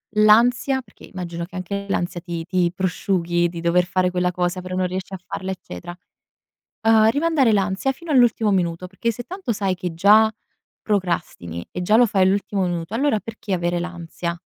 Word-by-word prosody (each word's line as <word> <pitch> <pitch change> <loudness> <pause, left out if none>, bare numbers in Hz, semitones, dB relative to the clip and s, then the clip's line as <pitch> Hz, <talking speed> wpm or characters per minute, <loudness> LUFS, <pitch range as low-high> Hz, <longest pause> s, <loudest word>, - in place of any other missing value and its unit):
l'ansia, 245 +5 +4
perché - - -21
immagino 170 -2 -6
che 175 - -9
anche 200 +2 -4
l'ansia 175 -2 -2
ti 170 -2 -5
ti 175 -2 +1
prosciughi 175 -2 0
di 170 -1 -7
dover 170 +1 +3
fare 185 0 +1
quella 180 0 0
cosa, 180 +1 -1
però 185 0 -5
non 185 0 +1
riesci 185 +1 -5
a - - -3
farla, 190 +1 -5
eccetera; 175 - -8 0.9
ehm, 220 0 +5
rimandare 285 -4 +2
l'ansia 200 +5 +1
fino 335 +4 -11
all'ultimo 240 -5 +4
minuto, 175 -1 -1
perché 195 +5 -2
se 240 - -8
tanto 370 -9 -4
sai 195 -3 -1
che 180 -1 -4
già 210 +6 +5 0.5
procrastini 170 - -2
e 180 - -4
già 210 +5 +4
lo 245 - +6
fai 195 -3 +1
all'ultimo 195 +1 +1
minuto, 175 +3 -3
allora 255 -4 +1
perché 225 -2 -7
avere 175 -1 0
l'ansia? 170 -1 -5
185 Hz, 180 wpm, -22 LUFS, 175-220 Hz, 0.9 s, lo